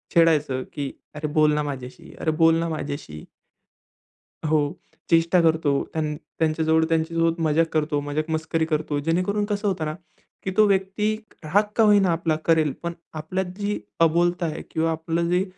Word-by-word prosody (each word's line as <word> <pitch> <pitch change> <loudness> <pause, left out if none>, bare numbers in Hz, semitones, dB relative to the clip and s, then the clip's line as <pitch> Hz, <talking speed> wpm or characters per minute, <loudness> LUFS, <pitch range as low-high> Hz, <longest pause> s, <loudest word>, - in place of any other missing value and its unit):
छेडायचं 150 -6 +3
की, 140 -2 -3 0.2
"अरे 150 0 -3
बोल 155 -1 +4
ना 150 - 0
माझ्याशी. 140 +3 -7
अरे 160 - 0
बोल 165 0 +6
ना 170 0 -1
माझ्याशी." 145 - -5 1.2
हो! 155 +1 +1 0.3
चेष्टा 170 +2 +4
करतो. 160 -4 +2
त्यां 155 -2 -1 0.2
त्यांच्याजवळ 160 0 +2
त्यांच्यासोबत 165 +1 +1
मजाक 160 +1 +2
करतो, 150 -1 +1
मजाक-मस्करी 160 +2 -1
करतो. 155 -2 -1
जेणेकरून 180 +7 0
कसं 205 0 -2
होतं 180 -5 -1
ना, 155 - -2 0.5
की 190 - -2
तो 215 - +7
व्यक्ती 200 +2 +1 0.3
राग 190 +7 +3
का 225 - +4
होईना 205 -3 +5
आपला 165 -1 0
करेल, 160 -3 +3
पण 170 0 -2 0.2
आपल्यात 160 +5 -3
जी 205 0 -2 0.2
अबोलता 175 +2 +3
आहे 155 - -3
किंवा 165 0 +1
आपलं 165 +1 -1
जे 180 +1 +2
160 Hz, 155 wpm, -24 LUFS, 155-175 Hz, 1.2 s, तो